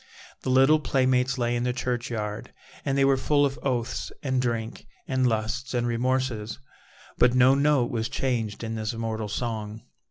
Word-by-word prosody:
The - - -3
little 135 +4 +5
playmates 130 -1 +1
lay 120 -1 0
in 120 - -1
the 125 0 0
churchyard, 120 -2 -3 0.3
and 135 -1 0
they 135 - +4
were 135 0 +4
full 145 +2 +3
of 135 -1 -3
oaths 125 -3 -2
and 130 -2 +1
drink 115 -2 -3 0.2
and 130 -1 +2
lusts 120 +4 -2
and 120 -1 +1
remorses, 120 -3 -1 0.6
but 125 0 +5
no 130 +1 +6
note 140 -3 +2
was 115 0 -2
changed 115 -6 -2
in 110 0 -3
this 110 0 -3
immortal 110 -2 -3
song. 110 -1 -4
125 Hz, 165 wpm, -26 LUFS, 115-130 Hz, 0.6 s, no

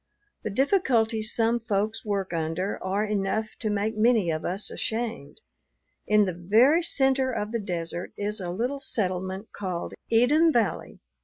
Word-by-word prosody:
The - - -3
difficulties 230 - +1
some 230 +1 +2
folks 220 -1 -1
work 200 -4 -2
under 165 +4 -2
are 195 +3 0
enough 210 +1 -1
to 220 - -2
make 210 +2 -1
many 215 -5 +3
of 155 0 -3
us 190 +4 -2
ashamed. 220 -11 -4 0.7
In 210 -1 +5
the 185 - -2
very 225 - +4
center 265 -5 +2
of 215 -3 -3
the 230 - -1
desert 175 -3 -4
is 210 +1 -2
a 180 -2 -4
little 245 +10 -2
settlement 190 -5 -2
called 185 -4 -4 0.2
Eden 295 +9 +4
Valley. 230 -7 -1
215 Hz, 150 wpm, -26 LUFS, 190-235 Hz, 0.7 s, In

